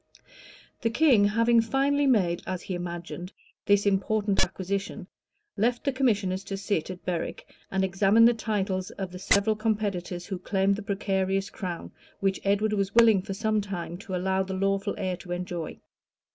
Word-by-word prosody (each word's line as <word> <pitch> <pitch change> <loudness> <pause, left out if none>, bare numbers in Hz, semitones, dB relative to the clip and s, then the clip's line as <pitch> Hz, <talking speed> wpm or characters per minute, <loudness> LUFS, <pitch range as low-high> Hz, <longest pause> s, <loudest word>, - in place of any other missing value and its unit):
The 230 - +1
king, 235 -5 +4
having 230 +3 +4
finally 275 +4 +1
made, 185 -9 +2
as 185 -1 -3
he 190 - -4
imagined, 175 +1 -5 0.4
this 205 0 +4
important 200 +1 +2
acquisition, 200 +2 -4 0.5
left 240 +3 +1
the 275 - +1
commissioners 205 -8 0
to 195 - -4
sit 195 -4 -1
at 185 -1 -8
Berwick, 175 -2 -3 0.2
and 190 0 0
examine 195 +4 +4
the 240 - +6
titles 200 -4 -2
of 190 -2 -6
the 180 - -8
several 200 +3 +3
competitors 200 -5 -2
who 190 -1 -5
claimed 195 +1 +1
the 210 - -6
precarious 195 -1 -1
crown, 175 -3 -5 0.3
which 195 -1 0
Edward 205 +2 +1
was 195 -1 -1
willing 225 -4 +6
for 195 0 -5
some 215 0 +1
time 180 -4 -5
to 195 -2 -5
allow 190 +1 0
the 190 0 -3
lawful 195 +1 0
heir 185 -2 -2
to 175 0 -6
enjoy. 175 -2 -5
195 Hz, 165 wpm, -27 LUFS, 185-215 Hz, 0.5 s, the